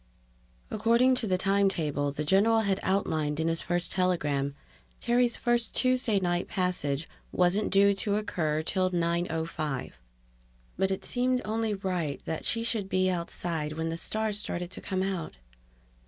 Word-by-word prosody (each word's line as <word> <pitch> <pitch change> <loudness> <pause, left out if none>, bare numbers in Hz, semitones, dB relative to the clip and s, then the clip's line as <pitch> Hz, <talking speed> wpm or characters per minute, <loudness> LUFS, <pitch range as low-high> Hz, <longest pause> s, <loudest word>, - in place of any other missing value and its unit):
According 235 +4 +4
to 225 - -2
the 185 -2 +2
time 195 +1 +3
table 145 -5 -1
the 145 +2 -3
general 205 +7 +4
had 200 -2 0
outlined 155 -6 0
in 160 - +1
his 165 0 +1
first 175 0 -1
telegram, 150 -7 0 0.4
Terry's 240 0 +2
first 240 -1 0
Tuesday 255 -5 +2
night 175 -1 0
passage 165 -5 -1 0.2
wasn't 180 +4 +2
due 200 +1 +5
to 200 +1 -1
occur 160 -7 -1
till 185 +2 +1
9:05. 165 -4 -1 0.8
But 190 - +1
it 190 - -3
seemed 250 0 +1
only 220 0 -1
right 180 -7 -2
that 160 - -3
she 230 -1 0
should 220 -4 -1
be 185 0 +2
outside 170 -3 -3
when 160 +1 -2
the 165 - -2
stars 215 +4 -2
started 175 -3 -4
to - - -8
come 190 -1 -1
out. 185 - -3
185 Hz, 155 wpm, -29 LUFS, 165-210 Hz, 0.8 s, due